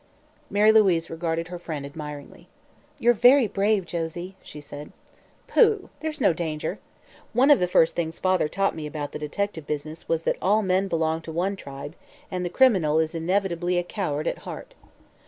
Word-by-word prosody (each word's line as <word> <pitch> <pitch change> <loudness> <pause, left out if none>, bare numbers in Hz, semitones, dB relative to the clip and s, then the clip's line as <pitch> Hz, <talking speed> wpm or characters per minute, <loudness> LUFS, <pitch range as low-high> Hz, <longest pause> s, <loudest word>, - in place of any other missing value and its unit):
Mary 210 +1 +5
Louise 190 -7 +3
regarded 165 0 -2
her 180 -1 -6
friend 155 -5 -5
admiringly. 150 0 -9 0.5
"You're 240 +1 +4
very 245 +3 +6
brave, 200 -1 +1
Josie," 175 +3 -5
she 150 - -11
said. 145 0 -10 0.6
"Pooh! 430 -4 +3
There's 310 -1 -4
no 195 - +4
danger. 155 -2 -3 0.5
One 260 +5 +5
of 290 - +7
the 180 - +1
first 165 -2 +3
things 165 -1 -2
father 185 -4 +2
taught 195 +5 0
me 155 -2 -5
about 145 -1 -5
the - - -6
detective 160 +1 -3
business 155 +2 -5
was 165 0 0
that - - 0
all 210 +3 +3
men 190 +1 +1
belong 160 -2 0
to 160 - -8
one 180 +5 -1
tribe, 140 -3 -8 0.4
and 180 -1 -2
the 175 - -2
criminal 180 - +3
is 160 0 +1
inevitably 175 +1 0
a 175 - +1
coward 165 -6 -3
at - - -2
heart. - - -9
175 Hz, 175 wpm, -25 LUFS, 160-200 Hz, 0.6 s, of